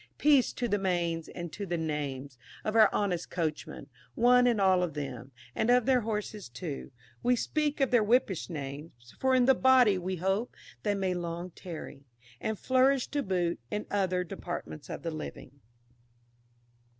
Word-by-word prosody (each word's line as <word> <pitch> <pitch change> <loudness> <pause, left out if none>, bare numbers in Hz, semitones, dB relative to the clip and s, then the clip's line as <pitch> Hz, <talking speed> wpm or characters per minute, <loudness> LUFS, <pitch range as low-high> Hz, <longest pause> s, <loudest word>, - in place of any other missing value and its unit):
"Peace 285 -4 +4
to 245 - -2
the 205 -2 0
manes 170 -3 -1
and 175 -2 -7
to 205 - -5
the 175 -3 -2
names" 145 -4 -3 0.3
of 215 - -2
our 220 -2 +7
honest 180 -4 -1
coachmen, 155 -4 -3 0.3
one 245 +1 +5
and 235 -3 +2
all 190 -2 +4
of 170 -4 -2
them, 135 -3 -6 0.2
and 220 - 0
of 245 -1 +5
their 260 -1 +4
horses 210 - -4
too 140 +5 -6 0.3
we 250 0 +3
speak 300 +4 -1
of 270 - +2
their 245 -2 +5
whippish 210 -6 +1
names, 140 -5 -8
for 265 0 +3
in 250 -1 +4
the 265 - +6
body 255 -7 +5
we 185 +1 -3
hope 190 +6 -1 0.3
they 205 -1 0
may 190 -2 0
long 175 0 -4
tarry, 160 -5 -9 0.4
and 220 -1 -2
flourish 260 +2 +3
to 290 - -1
boot, 180 -6 -1
in 210 - -3
other 185 -3 +1
departments 80 - -7
of - - -6
the 165 - -2
living. 140 -3 -8
190 Hz, 170 wpm, -30 LUFS, 165-240 Hz, 0.4 s, our